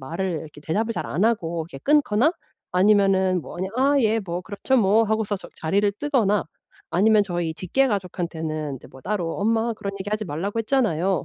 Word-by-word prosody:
말을 170 +8 -3
이렇게 150 -1 -12
대답을 215 +9 -1
잘 - - -4
안 180 +8 0
하고 170 -8 0
이렇게 135 - -8
끊거나 290 0 +3 0.4
아니면은 190 -1 +3
뭐 - - -9
그냥 190 +2 -3
"아 280 +2 +3
예. 225 -1 +2
뭐 175 -2 -4
그렇죠 205 +8 -1
뭐." 215 0 +4
하고서 215 -1 0
저 - - -11
자리를 200 +5 +1
뜨거나 230 -9 +1 0.5
아니면 210 +3 +4
저희 175 -4 -2
직계 265 +11 +1
가족한테는 160 - -3
이제 - - -14
뭐 130 - -14
따로 180 -1 -2
"엄마 225 +2 +1
그런 200 -1 -5
얘기 195 +2 -4
하지 215 0 -1
말라고 195 +9 -2
했잖아요." 195 - +1
200 Hz, 395 characters per minute, -24 LUFS, 170-220 Hz, 0.5 s, 뭐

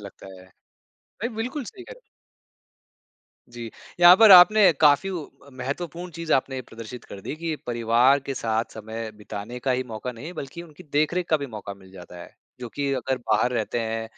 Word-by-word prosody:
लगता 100 -1 -12
है। 95 - -16 0.8
भई 235 - 0
बिल्कुल 250 +5 -4
सही 380 - -11
कह - - -11
रहे - - -13
हो। - - -27 1.5
जी, 120 -1 -8 0.3
यहाँ 175 +1 +9
पर 220 +1 +7
आपने 185 +2 +8
काफ़ी 150 +5 +4
व 175 -5 -5 0.3
महत्वपूर्ण 165 +7 -6
चीज़ 165 0 -4
आपने 130 0 0
प्रदर्शित 115 +1 -10
कर 100 - -10
दी, 95 - -6
कि 165 0 -3
परिवार 120 +3 +3
के 135 - -3
साथ 115 -2 -2
समय 110 +1 -6
बिताने 105 +3 -8
का 130 - -1
ही 130 0 +1
मौका 115 +2 -6
नहीं, 140 +9 -9
बल्कि 155 0 -8
उनकी 170 +1 -14
देख-रेख 160 +4 +1
का 160 - +5
भी 140 -2 -5
मौका 105 -4 -8
मिल 95 -1 -18
जाता 90 -1 -12
है। - - -15 0.3
जो 120 - -6
कि 140 -1 -1
अगर 130 +1 -2
बाहर 110 +3 +3
रहते 115 -1 -2
हैं 115 0 -3
130 Hz, 190 wpm, -24 LUFS, 115-170 Hz, 1.5 s, यहाँ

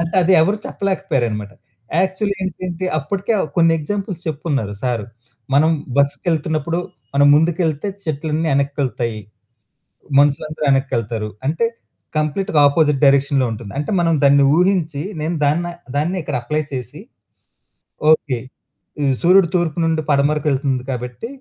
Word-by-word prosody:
అంటే 170 +1 -2
అది 185 +2 +3
ఎవరు 200 +6 +1
చెప్పలేకపోయారన్నమాట. 125 - -2 0.5
యాక్చువల్లీ 190 +2 -1
ఏంటంటే 185 -1 -4
అప్పటికే 195 +9 -2
ఆ - - +1
కొన్ని 165 -1 +5
ఎగ్జాంపుల్స్ 195 +2 -4
చెప్పుకున్నారు 140 -9 -2
సారు. 120 -4 -1 0.5
మనం 155 +3 +5 0.3
బస్సుకెళ్తున్నప్పుడు 155 +2 0 0.4
మనం 140 0 +5
ముందుకెళ్తే 160 +1 +1 0.2
చెట్లన్నీ 155 +1 -1
ఎనక్కెళ్తాయి. 135 -5 -1 1.0
మనుషులందరూ 150 +2 +1
ఎనక్కెళ్తారు. 115 -5 -1 0.2
అంటే 165 +10 +1 0.5
కంప్లీట్‌గా 155 +3 0
ఆపోజిట్ 150 -1 +2
డైరెక్షన్‌లో 140 -1 +3
ఉంటుంది. 110 -2 -7
అంటే 145 +6 -2
మనం 165 -1 +2
దాన్ని 140 0 +6
ఊహించి 175 -5 +1 0.2
నేను 160 +3 -1
దాన్న 155 +5 +1 0.3
దాన్నిక్కడ 165 +4 -1
అప్లై 150 +6 -1
చేసి 125 -4 -6 1.1
ఓకే. 140 -5 +1 0.6
ఈ - - +2 0.2
సూర్యుడు 180 +1 +5
తూర్పు 170 -3 0
నుండి 160 -1 +1
పడమరకెళ్తుంది 140 -2 +1
కాబట్టి, 125 - -5
150 Hz, 115 wpm, -19 LUFS, 140-170 Hz, 1.1 s, దాన్ని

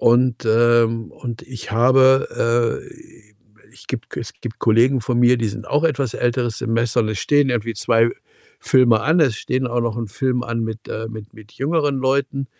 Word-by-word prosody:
Und 120 0 +2
ähm, 115 0 +2
und 120 -2 -8
ich 125 -4 -9
habe, 120 -1 +2
äh 110 - -17 0.5
ich - - -17
gibt - - -6
es - - -6
gibt 115 -2 -7
Kollegen 120 +4 +3
von 120 +2 -1
mir, 125 +1 +5
die 115 -2 -1
sind 100 - -8
auch 150 +3 +1
etwas 140 -6 0
älteres 120 -2 -1
Semester 115 0 0
und 110 - -1
es 110 - -4
stehen 145 +2 +2
irgendwie 115 -1 -2
2 115 +2 +2 0.5
Filme 120 -4 +3
an. 160 +8 +2
Es 130 -8 +2
stehen 130 +3 -2
auch 120 0 -1
noch 115 -2 -2
'n 115 -1 -3
Film 125 +3 -1
an 120 -1 -3
mit 110 0 -7
äh, 110 +1 -5
mit 110 -1 -10
mit 110 0 -16
jüngeren 145 0 -1
Leuten. 135 +1 -1
120 Hz, 185 wpm, -20 LUFS, 115-130 Hz, 0.5 s, mir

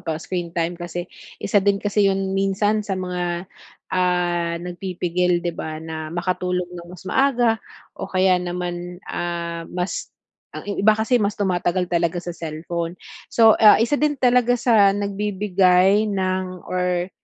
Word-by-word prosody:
pag-screen 170 +1 -4
time. 170 +1 -1
Kasi 175 0 -4 0.3
isa 200 0 +1
din 200 0 +2
kasi 205 0 +1
yun 195 0 -1
minsan 195 +2 +1
sa 200 -2 -3
mga, 180 -1 -3 0.5
ah, 175 -2 +1
nagpipigil 180 -1 -1
'di 175 - -1
ba 155 -1 -5
na 160 0 -6
makatulog 180 +1 -1
ng 175 -1 -9
mas 180 0 -12
maaga 240 -2 +2 0.3
o - - -7
kaya 185 -1 +3
naman, 175 0 -4
ah, 170 -1 -4
mas 180 +1 -3 0.5
ang - - -7
i 205 - -2
iba 215 +2 +5
kasi 230 +3 +2
mas 205 0 0
tumatagal 180 -2 0
talaga 170 -1 0
sa 175 0 -4
cellphone. 165 +1 -5 0.3
So, 225 -1 +5
ah, 215 -1 +8
isa 235 +6 +1
din 295 -1 +2
talaga 245 -1 +3
sa 225 -4 +5
nagbibigay 200 0 +2
ng 185 -2 -2
or 180 0 -1
180 Hz, 145 wpm, -22 LUFS, 175-200 Hz, 0.5 s, ah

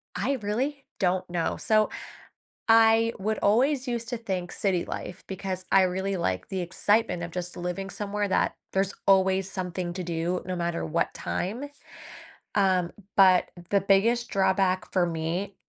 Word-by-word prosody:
I 280 - 0
really 265 +7 -2
don't 185 0 0
know, 170 -2 -1
so 215 -1 +2 0.8
I 225 0 +6
would 215 +2 -1
always 260 +5 +2
used 235 -1 -3
to 245 - -1
think 185 -6 -4
city 185 -4 0
life 180 - -6
because 190 -1 -4
I 195 - +7
really 190 +1 0
like 95 - -2
the 190 -1 -3
excitement 205 +2 +1
of 170 - -5
just 180 0 -5
living 180 +2 -4
somewhere 205 0 -2
that - - +1 0.2
there's 195 0 0
always 190 0 +3
something 180 -2 -3
to 185 - -4
do 170 +1 -2
no 185 - -2
matter 170 -1 -2
what 165 +1 -1
time, 240 +10 -3 0.9
um, 185 -3 +2 0.3
but 185 -2 +6 0.2
the 200 -1 +4
biggest 225 +5 +3
drawback 190 -1 +1
for 185 -2 +3
me 170 +4 -3
190 Hz, 155 wpm, -27 LUFS, 180-210 Hz, 0.9 s, I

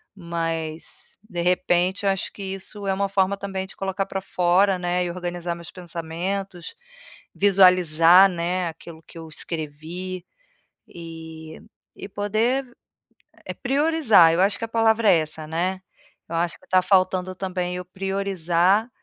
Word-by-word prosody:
mas, 165 -3 -5
de 175 -4 -3
repente, 180 +2 +1
eu - - +4
acho 195 - -3
que 200 - -8
isso 195 +1 -6
é 195 - +2
uma 200 +1 0
forma 195 0 +1
também 195 -1 -4
de 190 - -12
colocar 195 0 -2
pra 195 - -4
fora, 185 +2 +2
né, 180 0 0
e - - -3
organizar 175 -1 -4
meus 170 -1 -10
pensamentos, 175 +1 -5 0.6
visualizar, 180 -2 +6
né, 175 +1 -2
aquilo 160 0 -12
que - - -15
eu 160 - -9
escrevi, 165 +4 -6 0.6
e 160 -1 -10 0.4
e - - -8
poder, 220 +7 0 0.8
eh, - - -5
priorizar. 270 - +4
Eu 175 - +2
acho 200 +1 +2
que 230 - -2
a - - -9
palavra 225 -1 +3
é 175 - +6
essa, 155 0 -5
né. 180 +4 -2 0.5
Eu 165 - -4
acho 170 0 -1
que - - -22
tá 185 0 +4
faltando, 185 -1 +1
também, 180 -1 -3
eu 180 - -6
priorizar 190 +1 0
180 Hz, 150 wpm, -23 LUFS, 170-195 Hz, 0.8 s, visualizar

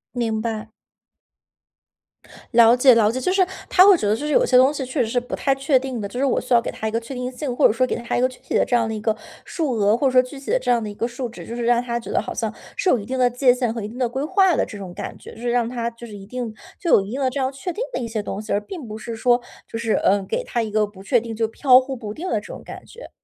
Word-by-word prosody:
明 225 -3 -1
白。 220 -1 -4 1.8
了 230 0 +7
解 250 0 +6
了 220 -1 +4
解。 260 - -3
就 365 - 0
是 380 -2 +4 0.2
他 370 +1 +7
会 385 -3 +7
觉 210 - -2
得 210 - +3
就 285 - -5
是 300 - -2
有 - - +4
些 250 - +4
东 265 +3 +5
西 270 -3 -4
确 260 +2 -1
实 - - -3
是 245 - +1
不 245 - -5
太 275 - +1
确 270 0 +2
定 260 -3 -5
的， 200 - -3
就 245 +5 -6
是 275 - +2
我 270 - +2
需 250 - -2
要 235 - +6
给 - - -4
他 220 - -4
一 - - -2
个 230 - 0
确 235 +4 -9
定 250 0 -4
性， 255 0 -4
或 - - +3
者 - - 0
说 255 +2 +2
给 - - -1
他 235 0 -3
一 - - +1
个 255 - +4
具 255 - -15
体 - - -7
的 - - +4
这 245 - +1
样 230 -2 +2
的 220 - -3
一 215 - -4
个 220 0 0 0.3
数 310 -6 -2
额， 210 0 +3
或 275 - +2
者 - - +1
说 255 0 +6
具 255 +2 -9
体 275 - -5
的 - - +3
这 - - -4
样 235 -2 +2
的 210 - -4
一 205 - -7
个 230 +3 -2
数 250 +1 -5
值， 235 - -10
就 235 - -6
是 240 - -3
让 240 0 +3
他 235 -1 -3
觉 - - -8
得 - - +1
好 - - -6
像 - - -3 0.2
是 375 - 0
有 250 - +3
一 200 - -8
定 260 +1 -3
的 250 -1 +4
界 250 0 +3
限 245 -3 -1
和 230 - -4
一 205 - -4
定 235 +3 -10
的 250 -2 +1
规 265 +3 -3
划 380 +2 +3
的 - - +1
这 205 - -9
种 190 -3 -8
感 - - -7
觉。 - - -12
就 225 - -12
是 240 - -1
让 240 -1 +1
他 235 -1 -3
就 230 +1 -11
是 210 - -10
一 195 -1 -10
定 240 0 -5 0.3
就 355 - -3
有 - - +7
一 195 +3 -7
定 270 - -3
的 260 - +2
这 280 - -4
样 260 0 0
确 275 +7 -5
定 470 - -3
的 - - -1
一 235 - -3
些 220 -2 -3
东 205 - -5
西， 215 - -7
而 205 - +2
并 310 - -8
不 215 +1 -6
是 230 +1 -6
说 240 +2 +2 0.3
就 - - -3
是， 230 -1 0
呃， 200 0 +2
给 - - -2
他 240 - -2
一 220 - -3
个 215 0 +2
不 200 -2 -14
确 240 +4 +3
定， 225 -1 -7
就 225 0 0
飘 255 +2 +5
忽 265 0 -5
不 215 -4 -7
定 340 +10 -6
的 - - 0
这 - - -15
种 - - -9
感 - - -10
觉。 480 +2 -12
245 Hz, 365 characters per minute, -22 LUFS, 225-265 Hz, 1.8 s, 了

